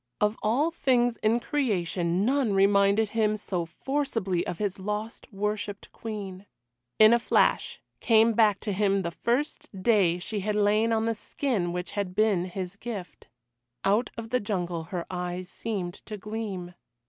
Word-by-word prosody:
Of 210 -1 +2
all 270 +10 +2
things 245 -6 +2
in 225 +2 +2
creation 190 - 0
none 255 -5 +2
reminded 200 +2 +4
him 215 -1 +1
so 180 -5 -3
forcibly 225 - -1
of 175 - -3
his 200 -2 -2
lost 210 +5 -5
worshipped 205 0 -3
Queen. 205 -3 -7 0.5
In 215 +1 +8
a 235 - +4
flash - - +2 0.2
came 225 0 +4
back 210 -3 +4
to 210 - -2
him 195 0 +2
the 170 - -2
first 245 - -1
day 195 -7 +4
she 205 +4 -4
had 210 +2 -1
lain 210 +2 +3
on 220 0 +1
the 230 - +1
skin 215 -5 -2
which 180 +1 -4
had 195 -3 -3
been 205 -4 +2
his 185 +1 -5
gift. 205 -8 -7 0.6
Out 210 +5 +2
of 225 0 -7
the 250 - +3
jungle 175 -6 -3
her 175 0 -4
eyes 180 0 -4
seemed 190 -6 -4
to 215 - -5
gleam. 200 -4 -5
210 Hz, 160 wpm, -27 LUFS, 185-225 Hz, 0.6 s, In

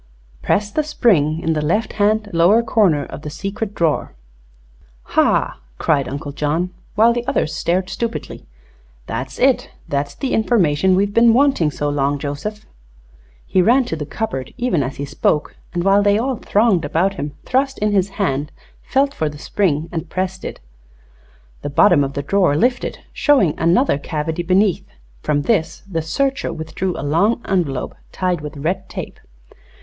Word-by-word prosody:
"'Press 205 0 0
the 310 - +1
spring 185 - +2
in 165 -1 0
the 155 - -1
left 175 +9 0
hand 215 +1 +1
lower 180 +8 +4
corner 200 -10 +2
of - - -9
the 150 - -6
secret 200 +5 -5
drawer.'" 165 -3 0 0.9
"Hah!" - - +1 0.2
cried 140 -4 +1
Uncle 145 +2 -5
John, 155 +5 -1 0.2
while 230 +3 +5
the 240 0 -2
others 275 - 0
stared 180 +2 0
stupidly. 230 +3 -5 0.6
"That's - - -5
it! - - +2 0.2
That's 140 0 -2
the 270 - -3
information 190 -6 +3
we've 200 +2 +1
been 230 0 +5
wanting 265 - +3
so 145 0 -3
long, 145 0 0
Joseph!" 145 +10 -5 0.8
He 185 - +2
ran 245 +7 +4
to 165 - -3
the 150 -2 -5
cupboard, 155 - -4
even 240 -11 +1
as 135 0 -3
he 140 - -4
spoke, 150 +1 0 0.2
and 175 -1 -2
while 195 +1 +4
they 205 0 +3
all 255 +2 -1
thronged 210 -5 +2
about 170 +7 +1
him 145 -6 -5
thrust 270 +1 0
in 210 0 0
his 195 -1 +2
hand, 150 -7 -1 0.3
felt 275 +1 +1
for 155 - -1
the 145 - -10
spring, 160 -2 0
and 165 -1 -4
pressed 185 +1 -3
it. - - -6 1.0
The 145 - -4
bottom 155 +1 +5
of 135 0 -3
the 140 - -3
drawer 180 -2 +2
lifted, 245 +5 0 0.2
showing 260 - +3
another 170 - +3
cavity 160 +2 -3
beneath. 185 +2 +2 0.4
From 145 -1 0
this 175 -7 0
the 165 -4 -2
searcher 270 - -1
withdrew 160 +3 -4
a - - -4
long 185 +11 +2
envelope, 165 -9 -1 0.2
tied 180 -3 -1
with 150 0 -7
red 180 +6 -2
tape. - - -7
180 Hz, 165 wpm, -19 LUFS, 150-215 Hz, 1.0 s, while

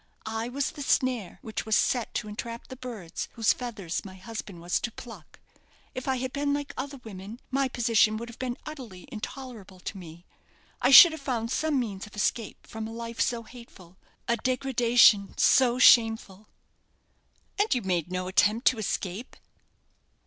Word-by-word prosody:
I 225 +2 -3
was 275 +2 -2
the 295 - -9
snare 255 -7 0
which 220 - -4
was 220 -1 +1
set 245 -3 +1
to 210 - -2
entrap 230 +3 -7
the 260 - -7
birds 235 -10 -7
whose 225 -2 +3
feathers 215 -9 -5
my 190 -2 -10
husband 200 -2 -8
was 175 +1 -1
to 235 - -4
pluck. 230 +1 -12 0.5
If 255 - -6
I 265 - +2
had 255 0 -4
been 285 0 0
like 290 -1 -5
other 275 +1 -5
women, 205 +2 -9
my 270 0 +1
position 230 -3 +2
would 235 +2 -6
have 235 - -12
been 250 -2 -3
utterly 250 -12 -9
intolerable 225 -5 -8
to 195 - -6
me. 170 0 -12 0.6
I 250 - +3
should 325 +5 +11
have 315 -2 -7
found 235 -4 -2
some 300 +1 +1
means 205 -5 -4
of 210 - -15
escape 210 +1 -2
from 220 0 -6
a - - -8
life 230 -1 -5
so 235 0 0
hateful 215 -7 -15 0.3
a 235 - +1
degradation 245 -5 +3
so 250 -2 +4
shameful." 225 -5 +4 1.1
"And 415 +2 +2
you 245 - -2
made 180 -2 -1
no 185 0 -3
attempt 210 +5 +2
to 255 - -4
escape?" 210 +1 -4
230 Hz, 170 wpm, -27 LUFS, 205-255 Hz, 1.1 s, should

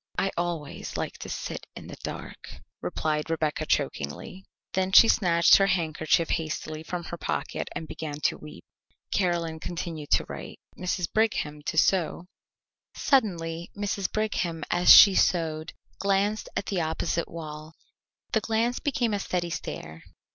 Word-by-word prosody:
"I 195 - +1
always 170 -4 -4
like - - -4
to - - -7
sit - - -5
in - - -9
the - - -8
dark," - - -8 0.3
replied 155 0 -2
Rebecca 160 -2 -1
chokingly. 75 - -2 0.3
Then 190 0 0
she 230 - +9
snatched 170 -6 +5
her 195 - +3
handkerchief 165 -2 +1
hastily 155 -1 -3
from 175 +2 -5
her 170 - -6
pocket - - -3
and 160 - -5
began 150 -2 -6
to - - +1
weep. 75 - -12 0.5
Caroline 170 -4 0
continued 160 -3 -5
to - - +3
write, - - -8 0.2
Mrs. 180 0 -1
Brigham 185 -9 0
to - - -2
sew. 175 0 +2 0.7
Suddenly 170 -10 +1
Mrs. 200 -2 -2
Brigham 180 -7 -1
as 175 0 +6
she 200 - +11
sewed 160 -4 +1 0.3
glanced 200 +2 +1
at - - -1
the 190 -4 -1
opposite 160 +1 -1
wall. 155 -1 -8 0.6
The 220 - +2
glance 225 +3 0
became 245 -7 0
a 205 - 0
steady 175 -3 -2
stare. 80 - -6
170 Hz, 145 wpm, -27 LUFS, 160-195 Hz, 0.7 s, she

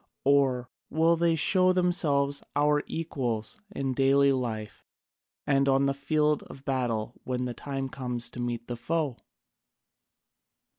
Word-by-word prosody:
Or 135 -3 +2 0.2
will 165 +2 +3
they 170 0 +2
show 185 +3 +3
themselves 145 -6 +2
our 145 0 +3
equals 125 -9 -3
in 135 -9 -2
daily 140 +1 +4
life 115 -5 -3 0.6
and 140 -1 +3
on 135 +1 +3
the 140 - +2
field 150 +1 +1
of 135 0 -12
battle 120 -4 -1
when 125 0 -2
the 125 - -3
time 135 +2 -4
comes 125 -3 -4
to - - -8
meet 120 -1 -3
the 120 - -4
foe?" 150 0 -1
135 Hz, 135 wpm, -28 LUFS, 125-150 Hz, 0.6 s, daily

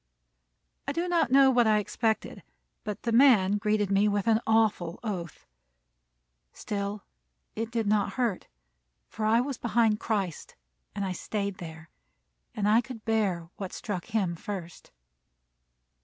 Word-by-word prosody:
I 280 - -1
do 340 +3 -1
not 345 -8 +2
know 270 +1 +6
what 240 -2 +4
I 215 -1 +4
expected, 220 +1 -1 0.4
but 210 -2 -5
the 235 - -1
man 220 -6 +5
greeted 210 -1 0
me 200 +1 +4
with 205 -1 0
an 225 0 +3
awful 215 -6 +1
oath. 180 -7 -5 1.1
Still 200 0 -4 0.5
it 225 +1 -3
did 230 -1 -1
not 205 0 +1
hurt; 235 -7 -1 0.6
for 215 - -4
I 225 +2 +4
was 270 -1 -4
behind 225 -2 +2
Christ, 195 -9 -3 0.4
and 200 - -2
I 190 - -2
stayed 200 +2 -4
there; 160 -1 -10 0.6
and 210 -2 0
I 220 +3 +5
could 245 -3 -10
bear 200 -7 0
what 195 -2 -6
struck 185 -5 -4
him 195 -5 -1
first. 175 -1 -7
210 Hz, 140 wpm, -28 LUFS, 195-230 Hz, 1.1 s, know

